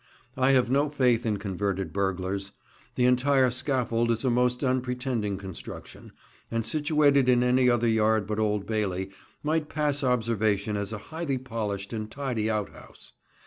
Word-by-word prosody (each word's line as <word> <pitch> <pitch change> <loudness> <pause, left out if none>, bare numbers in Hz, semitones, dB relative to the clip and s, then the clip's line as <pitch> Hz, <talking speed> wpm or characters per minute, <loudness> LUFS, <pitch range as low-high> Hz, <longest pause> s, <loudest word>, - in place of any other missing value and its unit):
I 130 0 +2
have 125 -2 +3
no 145 +2 +2
faith 125 -5 +2
in 105 -2 0
converted 95 -3 -3
burglars. 95 0 -2 0.4
The 125 - +2
entire 130 +1 +3
scaffold 120 -3 0
is 115 +2 0
a 130 - +3
most 125 +2 +1
unpretending 125 -5 -1
construction, 95 -3 -9 0.4
and 115 -1 -2
situated 145 -2 +3
in 125 -1 +4
any 125 0 +4
other 120 -1 +2
yard 110 -1 +2
but 105 +1 -3
Old 105 -2 0
Bailey 95 -3 -2 0.3
might 155 0 0
pass 145 -2 0
observation 110 -4 +1
as 100 +1 -2
a 110 - -4 0.2
highly 160 -5 -2
polished 110 -5 -4
and 110 -1 -4
tidy 125 -5 -2
out 105 -2 -1
house. - - -14
115 Hz, 155 wpm, -27 LUFS, 105-130 Hz, 0.4 s, in